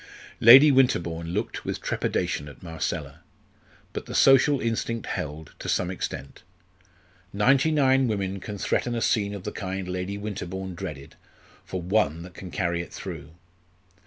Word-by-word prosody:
Lady 135 +6 +9
Winterbourne 85 -11 +2
looked 100 +7 -3
with - - -3
trepidation 75 - -2
at 75 - -15
Marcella. 80 -2 -4 0.7
But - - -5
the - - -6
social 135 +1 +5
instinct 115 0 -2
held, 75 +1 -5
to - - -5
some 90 - 0
extent. 70 -6 -6 0.9
Ninety 130 +9 +3
nine 135 -4 +3
women 100 -3 -2
can 105 +2 -7
threaten 120 +4 -1
a 115 - -2
scene 100 -2 +1
of 100 - -8
the - - -4
kind 95 -1 -4
Lady 90 +2 -3
Winterbourne 95 -2 -5
dreaded, 70 -5 -7 0.5
for 90 -2 -5
one 85 -4 +1
that 90 0 -11
can 95 - -9
carry 85 -2 -1
it 85 - -10
through. 80 -5 -8
95 Hz, 150 wpm, -26 LUFS, 85-115 Hz, 0.9 s, Lady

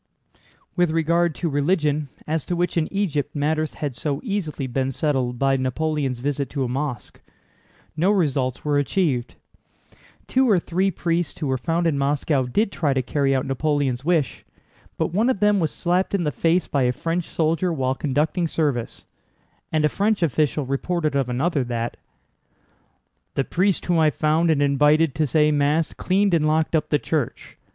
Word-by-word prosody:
With 175 -2 +2
regard 165 +1 +1
to 175 - -2
religion, 150 -1 0 0.2
as 155 -1 -1
to 175 - -2
which 175 0 -1
in 160 -2 0
Egypt 170 -10 -1
matters 155 +2 -1
had 145 -4 -4
so 140 +2 -2
easily 195 - -3
been 130 +1 -1
settled 130 -4 -1
by 135 +1 +2
Napoleon's 135 0 -1
visit 140 +2 -2
to 140 -2 -2
a - - -1
mosque, 130 -1 -4 0.7
no 170 +5 +2
results 140 -11 0
were 145 -1 +2
achieved. 145 -5 0 0.9
Two 260 -1 +2
or 200 - +5
three 180 +3 0
priests 170 -2 -2
who 155 - -2
were 130 -1 0
found 170 +4 0
in 150 -4 +1
Moscow 140 -1 +1
did 200 - 0
try 155 -5 0
to 130 - +1
carry 135 +3 +1
out 130 - 0
Napoleon's 135 -2 -1
wish, 160 -6 0 0.5
but - - -1
one 220 +7 +2
of 255 - 0
them 210 -1 +3
was 160 -3 +1
slapped 180 +3 0
in 185 - 0
the 150 - 0
face 170 +4 +1
by 140 - 0
a 125 -1 +3
French 165 +6 -2
soldier 165 +2 0
while 130 -5 0
conducting 150 +5 0
service, 145 -8 -2 0.7
and 155 -1 +2
a - - +6
French 200 +4 0
official 150 -1 +1
reported 155 +3 -1
of 135 -3 0
another 140 +3 0
that: 120 -1 -3 1.4
"The 135 - +1
priest 185 +6 0
whom 175 -2 +2
I 155 -1 +5
found 155 +3 +1
and 145 -3 +3
invited 150 +2 +3
to 155 +1 0
say 150 +3 +3
Mass 150 +2 +1
cleaned 195 +1 +1
and 155 -2 +3
locked 155 +1 +1
up 155 -1 0
the 150 - +3
church. 145 -4 -3
155 Hz, 175 wpm, -23 LUFS, 140-170 Hz, 1.4 s, a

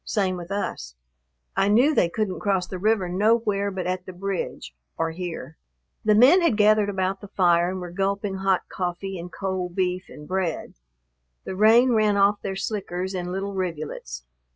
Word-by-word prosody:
Same 195 -4 0
with 175 -1 -8
us. 65 - -4 0.6
I 195 - +2
knew 245 +9 +4
they 170 - +3
couldn't 195 +1 -2
cross 195 -3 0
the 185 0 -7
river 210 -1 +2
nowhere 205 +1 +1
but 190 -2 -4
at 180 0 -3
the - - -5
bridge 195 - -4 0.2
or 165 0 0
here." 165 -4 -6 0.5
The 210 -1 +4
men 270 - +7
had 335 -11 +2
gathered 210 -1 +4
about 190 0 -1
the 205 - -9
fire 175 -2 +3
and 185 0 -4
were 175 -1 -7
gulping 195 +1 -1
hot 190 -1 +1
coffee 185 +1 -4
and 175 +1 -8
cold 185 -2 -3
beef 185 -1 -1
and 150 - -11
bread. 185 -4 -2 0.7
The - - -5
rain 225 +5 +5
ran 215 -3 +3
off 200 +1 +3
their 195 -1 -4
slickers 190 -2 -3
in 180 -1 -3
little 195 +2 -3
rivulets. 155 - -5
190 Hz, 175 wpm, -24 LUFS, 180-205 Hz, 0.7 s, men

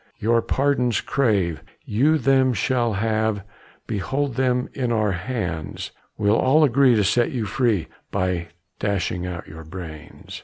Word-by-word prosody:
"Your 115 +2 +2
pardons 130 -2 +1
crave, 100 - 0 0.2
you 145 +9 +3
them 135 -3 +3
shall 120 +1 +1
have, 110 0 0 0.4
Behold 135 +7 -2
them 125 0 +1
in 125 -3 -1
our 110 -3 +2
hands; 90 -5 -4 0.3
We'll 105 +2 +3
all 150 +5 +4
agree 135 -2 +5
to 105 - +3
set 115 +5 +2
you 120 -4 -2
free, 110 -5 0 0.2
By 90 -3 -1 0.3
dashing 95 -3 -1
out 90 -2 -6
your 80 +1 -10
brains. 80 -2 -9
110 Hz, 140 wpm, -23 LUFS, 95-130 Hz, 0.4 s, agree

